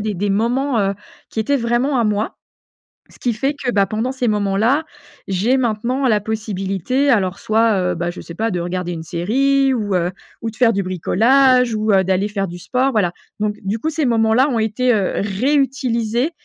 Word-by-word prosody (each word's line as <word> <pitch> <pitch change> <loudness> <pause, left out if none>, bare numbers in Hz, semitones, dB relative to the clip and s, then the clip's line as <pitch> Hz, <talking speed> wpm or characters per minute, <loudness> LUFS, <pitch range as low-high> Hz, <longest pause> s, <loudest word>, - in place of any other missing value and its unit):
des 210 0 -2
des 200 +3 -1
moments, 240 +5 +1
heu, 200 -1 +1 0.4
qui 220 - -2
étaient 280 +6 +1
vraiment 245 +2 0
à 235 - +2
moi, 210 +1 -1 0.7
ce - - -19
qui 240 -3 -1
fait 270 +6 -1
que 250 - 0
bah, 200 -1 +3
pendant 230 +4 -2
ces 255 -2 -1
moments-là, 210 +8 +1 0.4
j'ai 200 +7 +1
maintenant 245 +3 0
la 215 -3 +3
possibilité, 215 - -1
alors 195 -5 +1
soit, 220 0 +2 0.2
heu, - - -3
bah 175 +1 -2
je 175 - -9
sais 170 - -10
pas, 225 +1 0
de 175 - -1
regarder 175 0 -3
une 165 -2 -5
série 265 +11 +1
ou, 205 -4 -2
heu, 175 +1 0 0.3
ou 225 - -2
de 220 - -17
faire 240 -2 +4
du 200 - -1
bricolage 250 +7 +3
ou, 215 0 +1
heu, 190 -1 +4
d'aller 190 +2 +1
faire 200 -2 -2
du 175 - -8
sport, 255 +9 0
voilà. 185 -7 +1 0.3
Donc 210 0 -1
du 200 +4 -2
coup 315 +8 -2
ces 310 -2 -1
moments-là 230 +3 +3
ont 240 - 0
été, 230 +3 +1
heu, 200 -3 0
réutilisés 245 - 0
220 Hz, 200 wpm, -19 LUFS, 195-255 Hz, 0.7 s, faire